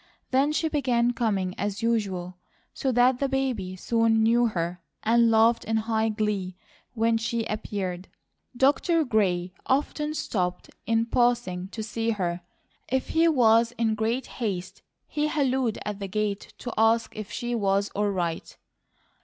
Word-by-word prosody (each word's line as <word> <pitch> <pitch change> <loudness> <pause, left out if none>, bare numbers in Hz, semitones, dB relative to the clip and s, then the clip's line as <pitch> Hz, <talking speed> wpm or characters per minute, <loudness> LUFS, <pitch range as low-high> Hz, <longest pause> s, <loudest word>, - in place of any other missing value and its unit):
Then 270 +3 +3
she 320 +1 0
began 245 -6 +1
coming 200 -6 -1
as 205 +1 -3
usual, 190 -6 -1 0.3
so 265 - -1
that 250 +1 +3
the 275 - 0
baby 250 -9 -1
soon 225 +2 +2
knew 235 +2 +4
her 180 -3 -3 0.2
and 230 +1 +4
laughed 225 +1 +4
in 225 +1 0
high 220 0 0
glee 210 -4 -2 0.4
when 225 0 +2
she 225 0 -2
appeared. 190 -4 -4 0.5
Dr. 315 +5 +3
Gray 185 -6 +1
often 300 +3 0
stopped 180 - -2 0.2
in 225 0 +2
passing 235 -7 +1
to 220 +2 -6
see 225 +1 -2
her; 180 -5 -1 0.5
if 260 0 -1
he 330 +1 +3
was 230 -5 +4
in 230 -2 0
great 225 +4 -1 0.2
haste, 190 -5 -3 0.2
he 300 0 -1
hallooed 265 -6 0
at 210 -1 -4
the 200 - -4
gate 210 0 -2
to 245 - -6
ask 225 +1 +3
if 215 -2 -7
she 240 -1 -3
was 200 -2 +1
all 205 0 -1
right. 175 -4 -3
225 Hz, 150 wpm, -26 LUFS, 200-245 Hz, 0.5 s, knew